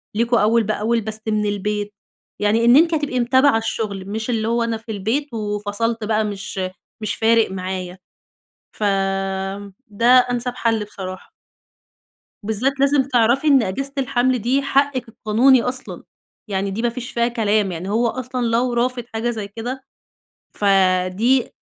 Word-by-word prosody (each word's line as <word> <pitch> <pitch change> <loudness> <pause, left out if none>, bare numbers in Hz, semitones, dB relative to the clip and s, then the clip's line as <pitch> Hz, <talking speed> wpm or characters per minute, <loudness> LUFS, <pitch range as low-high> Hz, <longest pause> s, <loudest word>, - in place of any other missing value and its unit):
ليكم 235 +2 +2
أول 225 +2 +3
بأول 220 +2 0
بس 220 0 -5
من 215 -1 0
البيت. 205 0 -2 0.5
يعني 215 +3 +2
إن 240 +1 +7
أنتِ 330 +3 +5
هتبقي 290 -5 -1
متابعة 260 +1 +4
الشغل، 210 -4 -3
مش 220 +3 -4
اللي 225 -2 0
هو 235 0 +1
أنا 230 -1 -1
في 225 +1 -9
البيت 230 +7 -2
وفَصَلت 210 +1 -2
بقى 215 0 +1
مش 195 -2 -5 0.4
مش 215 -1 -2
فارق 225 -2 +3
معايا. 185 -1 -5 0.8
ف - - -10 1.1
ده 215 +3 -1 0.2
أنسَب 245 0 -2
حل 225 -3 0
بصراحة. 185 -2 -8 1.1
بالذات 240 +6 -1
لازم 275 0 +3
تعرفي 255 +2 +2
إن 275 -4 +5
أجازة 270 +8 -3
الحَمل 255 -1 +1
دي 255 +6 +1
حقِك 275 -2 +1
القانوني 235 +4 +3
أصلًا. 255 +1 -5 0.4
يعني 195 0 -2
دي 215 - -3
ما 240 - +1
فيش 240 +1 -6
فيها 235 0 +1
كلام 215 -4 +1
يعني 175 +3 -5
هو 230 +3 +2
أصلًا 255 +1 -3
لو 240 +2 +1
رافض 245 +1 0
حاجة 225 +2 -1
زي 215 -4 -4
كده، 245 +5 -6 0.7
فدي 195 +5 +2
230 Hz, 150 wpm, -20 LUFS, 210-250 Hz, 1.1 s, إن